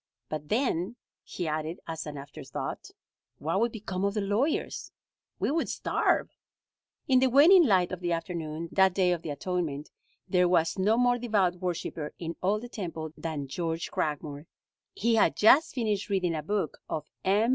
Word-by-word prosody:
But 155 -1 -5
then," 220 -4 0 0.3
he 175 - -5
added 155 +2 -3
as 160 -1 -5
an 145 -1 -6
after 140 0 -9
thought, - - -5 0.5
"what 165 +6 -1
would 235 +1 +2
become 195 -4 -4
of 200 +1 0
the 210 - +1
lawyers? 210 +10 -1 0.5
We - - 0
would 325 +2 0
starve." - - +1 0.8
In 260 -3 +5
the 260 0 +4
waning 315 +6 +7
light 185 -4 +3
of 185 - -4
the 175 -1 -2
afternoon, 165 -1 -3
that 190 -1 +4
Day 185 -2 +3
of 175 -2 -1
the 165 - -6
Atonement, 150 -1 -3 0.4
there 180 -1 +3
was 170 0 +2
no 210 +4 +3
more 245 0 +3
devout 200 -7 +1
worshiper 170 -4 -4
in 165 -1 -5
all 200 +3 +2
the 245 - -8
temple 165 -8 -5
than 155 -4 -4
George 165 +3 -3
Cragmore. 150 0 -3 0.5
He 230 +3 +1
had 225 - +4
just 265 +9 +5
finished 215 -5 -1
reading 185 -4 +1
a 155 - -2
book 190 -1 -2
of 155 -1 -3 0.2
M. 205 +5 +3
180 Hz, 175 wpm, -28 LUFS, 160-215 Hz, 0.8 s, waning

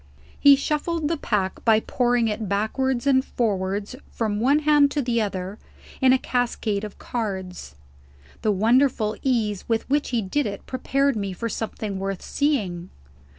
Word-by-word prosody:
He 285 -1 +8
shuffled 300 +3 -1
the 335 - +1
pack 200 -8 -2
by 220 -2 +5
pouring 245 0 +1
it 215 -2 -3
backwards 240 +5 0
and 265 -2 +4
forwards 200 -2 -2
from 210 -3 -2
one 270 +6 +4
hand 295 -2 +5
to 290 +1 -1
the 235 -2 +1
other, 195 0 -4 0.4
in 260 -1 +6
a 260 - +5
cascade 235 -5 -1
of 210 - -7
cards. 190 - -5 0.7
The 215 - +2
wonderful 225 +1 +2
ease 220 -7 0
with 225 -1 0
which 290 0 +1
he 235 -3 0
did 280 +9 0
it 200 -1 -7
prepared 275 +1 0
me 200 -3 -3
for 230 +5 -4
something 215 -3 -4
worth 195 -1 -4
seeing. 195 - -1
225 Hz, 155 wpm, -24 LUFS, 200-265 Hz, 0.7 s, He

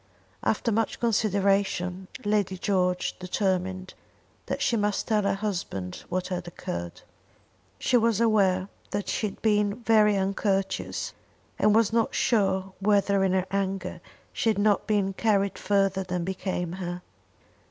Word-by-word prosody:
After 230 - 0
much 225 +1 0
consideration 195 -4 +1 0.2
Lady 205 -3 +1
George 180 -1 0
determined 185 0 -1 0.5
that - - -2
she 235 - +1
must 210 -2 0
tell 215 -2 +2
her 200 - +1
husband 175 - -4
what 185 0 -2
had 180 -1 -4
occurred. 85 - -6 0.8
She 250 - +2
was 230 -2 +2
aware 195 -5 +3 0.2
that 205 - -3
she 215 - 0
had 200 - -9
been 210 +1 +1
very 215 -2 +4
uncourteous, 195 0 -1 0.5
and 210 0 +4
was 225 -1 +3
not 230 -1 +1
sure 195 -4 +1
whether 200 -1 +3
in 190 -1 +2
her 190 -1 +1
anger 195 -2 -2 0.3
she 225 - +1
had 215 - +1
not 205 0 +2
been 200 -3 +1
carried 200 -1 +1
further 195 -1 +1
than 180 -1 -3
became 185 -1 -3
her. 180 -1 -5
195 Hz, 140 wpm, -27 LUFS, 185-210 Hz, 0.8 s, very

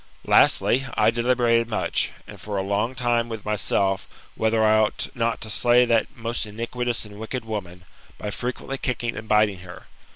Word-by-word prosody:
Lastly, 135 +2 +4
I - - +4
deliberated 120 -1 +2
much, 110 - 0 0.2
and - - -12
for 105 -1 -4
a 95 - 0
long 105 +6 -1
time 120 -2 0
with 110 -3 -6
myself, 100 -2 0 0.3
whether 110 0 +1
I 110 0 +5
ought 110 -1 0
not 115 -1 -1
to 110 - -6
slay 120 +3 +4
that 115 -2 +1
most 115 -1 -2
iniquitous 115 +2 -2
and 105 0 -12
wicked 115 +2 -5
woman, 90 -5 -6 0.3
by 105 - -5
frequently 130 +4 -4
kicking 120 -1 -2
and 110 - -7
biting 105 -3 +3
her. 90 0 -11
115 Hz, 170 wpm, -24 LUFS, 105-120 Hz, 0.3 s, I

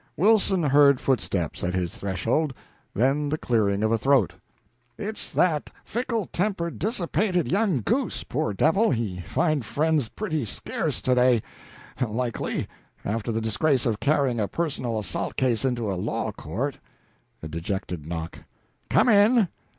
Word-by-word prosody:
Wilson 195 -1 +4
heard 140 -2 +5
footsteps 95 - -1
at 90 +1 -1
his 90 -2 -2
threshold, 115 - -1 0.4
then 135 +7 +2
the 155 - 0
clearing 105 -6 +1
of 110 - +2
a 115 - +2
throat. 135 -7 +3 0.6
"It's 215 +2 -2
that 160 -5 +1
fickle 235 -3 -2
tempered, 175 -3 -1
dissipated 185 - 0
young 195 - +2
goose - - -1
poor - - -2
devil, 165 - +3
he 110 -7 -1
find 155 - 0
friends 150 -1 +1
pretty 160 -9 -2
scarce 110 - -3
to 130 - +3
day, 125 -2 +4 0.6
likely, 120 +1 -2 0.4
after 115 +2 -2
the 110 0 -1
disgrace 120 +5 +1
of 110 -3 0
carrying 140 -5 +1
a 105 - +1
personal 130 -8 -2
assault 100 -6 -3
case 125 -3 +1
into 120 -5 0
a 90 -2 -3
law - - -2
court." - - -4 0.6
A - - -4
dejected 85 -1 -4
knock. 80 -1 -5 0.5
"Come - - +4
in!" 215 -1 +5
130 Hz, 145 wpm, -25 LUFS, 110-170 Hz, 0.6 s, heard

